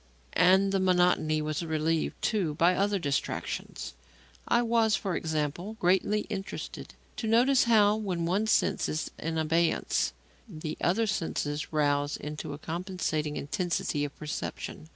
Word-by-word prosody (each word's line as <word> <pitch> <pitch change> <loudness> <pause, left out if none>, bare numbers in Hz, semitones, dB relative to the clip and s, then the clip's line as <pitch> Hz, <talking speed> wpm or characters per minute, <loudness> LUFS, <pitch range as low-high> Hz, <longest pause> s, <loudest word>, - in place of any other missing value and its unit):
And 190 +2 +5
the 195 - +1
monotony 180 -4 +2
was 155 +1 -2
relieved, 160 0 -1
too, 185 -9 0
by 170 +4 +4
other 200 +2 +1
distractions. 145 -6 -3 0.5
I 240 - +3
was, 230 -2 +3
for 190 -4 -2
example, 160 +6 -2
greatly 190 +4 +2
interested 195 -3 -6 0.2
to 225 - -3
notice 250 +4 +4
how, 215 -2 +5
when 185 -6 -2
one 195 +6 +1
sense - - +2
is 155 - -3
in 160 +1 -2
abeyance, 165 +2 +1 0.4
the 155 -4 -5
other 210 +6 +2
senses 155 -7 -2
rouse 145 -1 +1
into 150 0 -6
a - - -6
compensating 160 -3 -3
intensity 150 -1 -1
of 145 -1 -5
perception. 155 +1 -5
175 Hz, 135 wpm, -29 LUFS, 155-200 Hz, 0.5 s, And